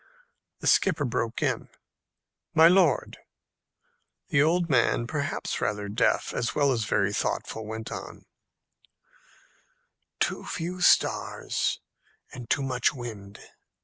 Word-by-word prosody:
The - - -7
skipper 165 -7 +3
broke 115 -2 -2
in, - - -1 0.9
"My 160 +1 +8
lord!" 175 -5 +3 1.1
The 140 - +3
old 170 +3 +2
man, 120 -4 +2
perhaps 145 +2 -3
rather 105 0 -2
deaf 110 +4 +1
as 120 - -2
well 145 -2 +3
as 115 -4 0
very 100 0 +1
thoughtful, 110 +1 -3
went 110 0 -6
on, - - -8 1.9
"Too - - -1
few 180 +2 -5
stars, - - +1 0.5
and 125 -3 -9
too 140 - +1
much 130 +1 0
wind. 105 -5 -8
125 Hz, 115 wpm, -27 LUFS, 110-155 Hz, 1.9 s, My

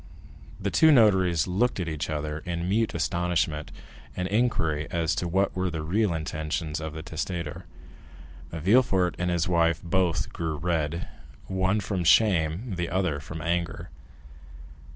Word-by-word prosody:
The - - -2
two 160 -1 +6
notaries 95 - +4
looked 100 +6 0
at 90 - -2
each 80 -1 -3
other 75 0 -3
in 85 +1 -4
mute 110 +2 +1
astonishment 85 -2 -1 0.5
and 90 - -1
inquiry 90 -9 0
as 85 -1 0
to 90 - -2
what 95 +3 +1
were 95 0 0
the 80 -2 -4
real 100 +5 +1
intentions 80 0 -3
of 80 -1 -5
the 80 0 -7
testator. 85 -1 -4 0.9
Villefort 95 +1 +3
and 90 0 0
his 85 -2 0
wife 85 -2 +2
both 90 -1 0
grew 80 -2 -3
red, 85 +1 -1 0.4
one 95 +2 +1
from 95 -3 -2
shame, 95 +2 +3
the 85 -1 -2
other 90 -5 0
from 80 +3 -7
anger. 85 0 -2
85 Hz, 145 wpm, -26 LUFS, 80-95 Hz, 0.9 s, two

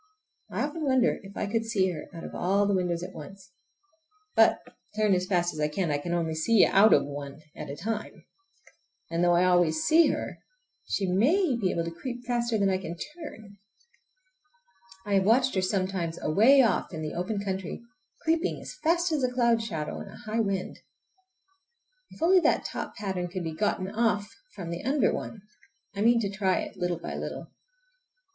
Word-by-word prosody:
I - - -2
often 300 +2 -4
wonder 260 -3 +2
if 195 0 -12
I - - -1
could 225 +2 -1
see 200 -5 +1
her 155 -3 -7
out 165 -3 -9
of - - -8
all 195 +3 +1
the 200 - +1
windows 180 -2 0
at - - -7
once. 190 +4 -11 0.8
But, - - +5 0.4
turn 215 -2 +3
as 185 0 0
fast 175 -2 +1
as 155 - -8
I 150 - +2
can, 165 +1 -1
I 145 - 0
can 170 +4 -5
only 165 -2 0
see 195 +7 +4
out 210 +3 +5
of - - +5
one 145 0 -7 0.2
at - - -7
one 140 - -6
time. 215 +5 -5 0.9
And 165 +1 0
though 175 0 +4
I 175 - +4
always 175 -3 +3
see 330 +1 +5
her - - -3 0.5
she 200 - -1
may 260 - +2
be 205 -6 0
able 170 - -1
to 165 - -4
creep 245 +8 -7
faster 235 -2 0
than 200 -2 +2
I 185 - 0
can 175 -2 -6
turn! 225 - -9 1.5
I 205 - -2
have 195 -1 +4
watched 250 +6 +3
her 190 - +1
sometimes 185 -3 -1
away 240 - +5
off 225 - +1
in 160 -3 -5
the 155 - -4
open 200 +4 -2
country, 195 +1 -4 0.4
creeping 330 +2 0
as - - -8
fast 340 +1 +2
as 300 -4 0
a 250 - +1
cloud 235 -2 +2
shadow 160 -9 -4
in - - -8
a - - -11
high 225 -1 -3
wind. 195 -4 -2 1.3
If - - -8
only 370 +2 +6
that - - +2
top - - -5
pattern 190 -3 -3
could 180 0 -5
be 160 -1 -4
gotten 185 +1 -1
off 215 -2 0 0.2
from 170 -2 -6
the 170 - -5
under 275 +3 +2
one! 210 -3 -6 0.5
I 200 - -3
mean 235 +2 +5
to 200 - -1
try 195 -2 +1
it, - - -7
little 175 -1 -1
by - - -6
little. - - -6
195 Hz, 195 wpm, -28 LUFS, 175-235 Hz, 1.5 s, only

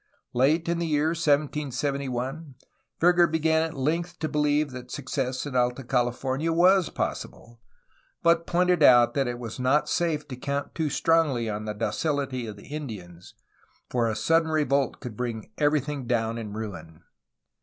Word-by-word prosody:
Late 150 +7 +2
in 170 0 0
the 170 - -1
year 150 0 +2
1771 140 -2 -1 0.4
Verger 175 0 +5
began 160 0 +2
at 160 0 -3
length 170 +6 -1
to 155 - -2
be 150 - -2
lieve 150 0 +2
that 125 -1 -9
success 130 -1 -3
in 140 -3 -6
Alta 125 +1 +1
California 130 +5 0
was 180 +1 +4
possible, 120 0 -5 0.6
but 170 0 +3
pointed 180 -1 +2
out 120 -4 +7
that 135 -2 0
it 120 0 -3
was 120 0 -7
not 130 +4 +2
safe 160 -3 -1
to 130 - -5
count 140 +3 -3
too 160 -2 -1
strongly 150 -7 +2
on 105 0 -4
the 105 - -3
docility 135 +1 -2
of 105 - -7
the 100 - -14
Indians, 100 - -8 0.6
for 120 -2 +1
a 110 - -2
sudden 165 +7 +2
revolt 140 -3 +1
could 120 -3 -7
bring 115 -2 -4
everything 145 -3 0
down 115 -1 0
in 105 -2 -6
ruin. 90 -7 -7
140 Hz, 160 wpm, -26 LUFS, 120-160 Hz, 0.6 s, out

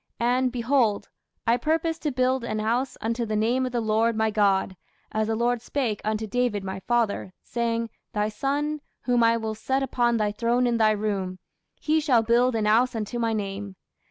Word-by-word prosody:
And, 250 +2 +2
behold, 235 -4 +1 0.4
I 230 +1 +3
purpose 325 +3 0
to 300 - -1
build 255 0 +1
an 215 -2 -2
house 235 +5 -1
unto 230 +2 -1
the 215 -1 -2
name 240 +5 +1
of - - -5
the 240 - 0
Lord 225 +1 +1
my 220 0 +1
God, 200 -2 +2 0.4
as 215 0 0
the 225 - 0
Lord 240 +1 +1
spake 240 -4 -2
unto 215 +1 -1
David 220 -2 -1
my 190 0 -4
father, 220 -3 0
saying, 230 -1 -2 0.2
Thy 210 0 0
son, 285 +7 -2 0.2
whom 245 -1 +2
I 230 0 +4
will 220 -1 -3
set 265 +5 -1
upon 240 -2 +1
thy 210 -1 +1
throne 235 +3 +1
in 240 -1 +1
thy 220 -1 +4
room, 200 -3 -1 0.4
he 315 +1 +2
shall 260 -7 +3
build 240 +2 +3
an 220 -1 0
house 235 +4 +3
unto 225 +2 -3
my 230 -1 +1
name. 200 -2 -4
230 Hz, 190 wpm, -25 LUFS, 215-250 Hz, 0.4 s, I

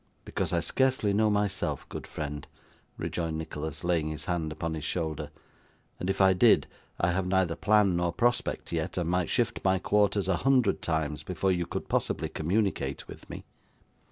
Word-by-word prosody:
'Because - - -2
I - - +1
scarcely 130 -6 +1
know 110 +1 +3
myself, 105 -1 -1
good - - -7
friend,' 75 -1 -5 0.5
rejoined 80 -2 -2
Nicholas, 80 -1 -5
laying 85 -3 +1
his 75 0 -5
hand 85 -3 -1
upon 80 +1 -3
his 80 -2 -5
shoulder; 80 -3 -2 0.7
'and 90 - -3
if 95 - -1
I 95 -1 +6
did, 90 - +5 0.3
I 85 - +2
have 90 +1 -1
neither 95 -3 +2
plan 105 -4 +3
nor 85 -1 +1
prospect 120 +7 0
yet, - - -2
and 85 -2 0
might 90 0 +1
shift 115 -2 0
my 95 0 +3
quarters 100 0 +2
a 95 -2 +2
hundred 125 -6 +3
times 75 -2 -1
before 95 +1 -1
you 90 -2 0
could - - -4
possibly - - 0
communicate 95 +6 -1
with - - -12
me. - - -8
90 Hz, 175 wpm, -29 LUFS, 80-100 Hz, 0.7 s, I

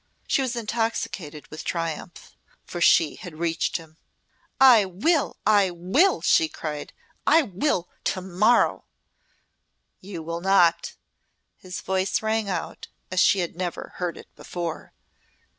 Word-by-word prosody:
She 275 - +2
was 260 -2 -2
intoxicated 220 -9 -3
with 155 - -7
triumph 165 0 -5 0.3
for 175 - -6
she 165 -2 +4
had 170 -4 -10
reached 165 0 -1
him. 160 -1 -15 0.6
"I 250 -5 +8
will! 230 - 0
I 205 -3 +4
will!" 185 - +2
she 325 -2 +4
cried. 150 - -6 0.4
"I 320 +3 +6
will 195 - -1 0.2
to - - 0
morrow!" 190 +6 +2 1.1
"You 185 -4 -8
will 170 +1 -4
not!" 190 -3 +3 0.6
his 180 -1 -8
voice 190 +2 -1
rang 220 -1 0
out 185 - -4 0.2
as 185 - 0
she 190 0 +4
had 170 - -4
never 175 -1 -5
heard 175 -3 -3
it - - -11
before. 170 -3 -6
185 Hz, 130 wpm, -25 LUFS, 170-220 Hz, 1.1 s, I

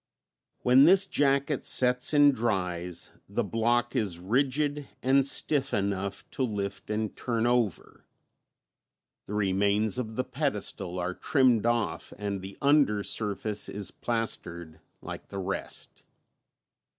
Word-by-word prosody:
When 130 +3 +6
this 190 +3 +6
jacket 140 -4 +1
sets 125 0 +3
and 145 -1 +6
dries 90 -7 -2 0.2
the - - -1
block 120 +1 0
is 95 -6 0
rigid 140 - 0 0.2
and 135 +1 +4
stiff 140 -1 +2
enough 100 -1 -2
to - - -5
lift 105 -6 -3
and 110 0 -2
turn 115 -2 -1
over; 120 -6 -1 1.2
the 105 - -5
remains 100 +3 +1
of 110 -3 -5
the 130 - 0
pedestal 125 - -3
are 90 +1 -2
trimmed 125 -2 +2
off 120 -1 -1
and 100 -1 -4
the 95 +1 -9
under 140 -8 +3
surface 105 0 -2
is 100 -3 -4
plastered 85 -8 -4 0.2
like - - -8
the 100 - -8
rest. 95 +1 -5
110 Hz, 125 wpm, -28 LUFS, 100-130 Hz, 1.2 s, When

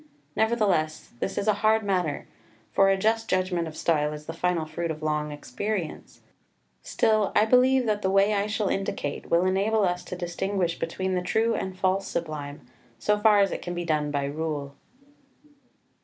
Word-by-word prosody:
Nevertheless 210 -9 0
this - - -3
is 200 - -1
a 215 - +5
hard 220 0 +3
matter; 180 -7 -1 0.4
for 195 0 +4
a 195 - +3
just 225 +3 0
judgment 185 -2 0
of 155 0 -9
style 150 -2 +1
is 150 0 -9
the 165 - -5
final 170 -1 0
fruit 170 +2 -4
of 155 -1 -5
long 150 -1 -1
experience; 170 +5 -5 0.6
still, 215 -2 +1
I 210 - +5
believe 255 +2 +4
that 210 -2 0
the 190 - +1
way 195 +2 +4
I 200 0 0
shall 215 -1 -1
indicate 195 -7 -3
will 170 +2 +3
enable 200 +3 +2
us 180 -1 0
to 180 - -6
distinguish 175 0 -2
between 185 +3 -2
the 180 - 0
true 220 +5 +1
and 190 -1 -4
false 190 +1 0
Sublime, 150 -3 -4 0.4
so 210 - +1
far 210 -1 +5
as 195 - +2
it - - -4
can 175 - -5
be 175 0 -3
done 150 -2 0
by 140 -1 -1
rule. 145 -1 -3
185 Hz, 180 wpm, -26 LUFS, 160-210 Hz, 0.6 s, a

